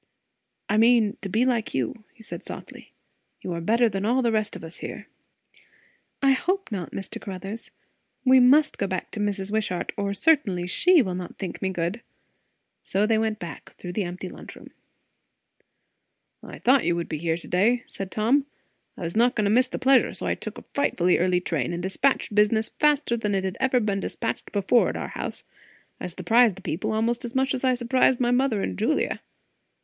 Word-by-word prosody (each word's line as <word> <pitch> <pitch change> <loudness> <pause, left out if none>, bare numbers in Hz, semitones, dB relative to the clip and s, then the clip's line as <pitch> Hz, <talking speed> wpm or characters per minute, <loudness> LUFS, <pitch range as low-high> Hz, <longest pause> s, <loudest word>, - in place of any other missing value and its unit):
"I 210 - +1
mean, 225 -2 +4
to 195 - -5
be 225 +6 +2
like 240 -4 0
you," 135 - -3
said 225 - -8
he - - -16
softly. - - -10 0.5
"You 180 - -4
are 170 - -4
better 230 +7 +3
than 195 -2 -3
all 250 +4 +2
the 235 - +2
rest 215 -1 -1
of - - -9
us 165 +1 -9
here." - - -7 1.2
"I 275 - +6
hope 370 +5 0
not. 185 -5 -4
Mr. 195 - -6
Caruthers, 195 +3 -6 0.6
we 260 0 +7
must 285 +5 +5
go 200 - 0
back 185 -1 -4
to - - -6
Mrs. 205 -1 -2
Wishart, 210 -5 -1
or 200 -1 -1
certainly 220 - +2
she 340 - +4
will 185 -4 -3
not 180 -1 -6
think 185 -4 -6
me 190 - 0
good." 180 +5 -2 0.8
So 200 +2 0
they 220 0 +2
went 220 -1 0
back, 175 -4 -9
through 180 - -8
the 210 - -1
empty 180 +2 -6
lunch - - -10
room. - - -14 1.7
"I - - -10
thought 260 +1 +4
you 175 - +1
would 170 -1 -3
be 155 - -4
here 165 0 0
to 170 - -11
day," 230 +7 +2
said 195 -1 -7
Tom. 255 +8 +1 0.5
"I - - -9
was 165 0 -4
not 240 +2 +3
going 215 - +1
to 200 - +2
miss 250 +3 +4
the - - -5
pleasure; 265 -1 +3
so - - -4
I - - +1
took - - -7
a - - -10
frightfully 180 -10 +2
early 180 0 +2
train, 165 -5 -2
and 175 +1 -4
despatched 220 +5 0
business 215 +1 +3
faster 295 -5 +2
than 210 -3 -1
it 190 - 0
had 190 -1 -2
ever 260 -1 +2
been 205 -3 -1
despatched 225 +3 -4
before, 205 +4 +3
at - - -4
our - - -5
house. - - -5 0.6
I - - -4
surprised 195 +5 +3
the 195 - -13
people, 160 +1 -2
almost 230 +2 0
as 240 0 -6
much 265 0 +2
as 250 - -3
I 255 -1 +3
surprised 245 +1 +2
my 245 -1 +2
mother 245 -5 +1
and 90 -1 -4
Julia. - - 0
215 Hz, 205 wpm, -25 LUFS, 185-245 Hz, 1.7 s, we